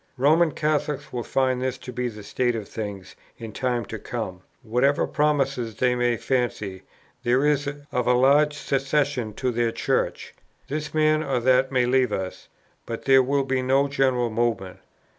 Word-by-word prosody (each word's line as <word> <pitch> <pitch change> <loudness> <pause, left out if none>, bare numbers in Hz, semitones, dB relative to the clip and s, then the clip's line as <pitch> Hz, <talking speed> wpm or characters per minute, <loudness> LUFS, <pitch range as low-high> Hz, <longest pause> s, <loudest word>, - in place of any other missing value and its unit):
"Roman 155 +5 +4
Catholics 150 -2 -1
will 120 - -2
find 130 +1 0
this 130 0 -2
to 125 - -9
be 125 +1 -2
the 105 -3 -8
state 120 +3 0
of 110 -3 -5
things 100 -4 -7 0.2
in 115 -1 -8
time 120 0 -1
to - - -7
come, 90 -1 -5 0.2
whatever 125 +5 +2
promise 145 -2 +1 0.2
they 125 -1 +2
may 120 -1 +1
fancy 110 -8 -2 0.4
there 125 +4 +2
is 145 -1 +2 0.2
of 125 -1 -1
a 125 - +5
large 145 +4 +4
secession 135 -4 0
to 130 +4 -1
their 120 -1 0
Church. - - -1 0.3
This 150 +2 -4
man 155 0 +3
or 135 -4 -1
that 130 +2 +3
may 125 -2 +2
leave 125 -1 +2
us, 95 -2 -4 0.4
but 115 - -5
there 135 -1 +6
will 140 +2 +1
be 130 -1 0
no 135 +2 +2
general 130 -4 +1
movement. 110 -5 -1
130 Hz, 170 wpm, -24 LUFS, 120-140 Hz, 0.4 s, there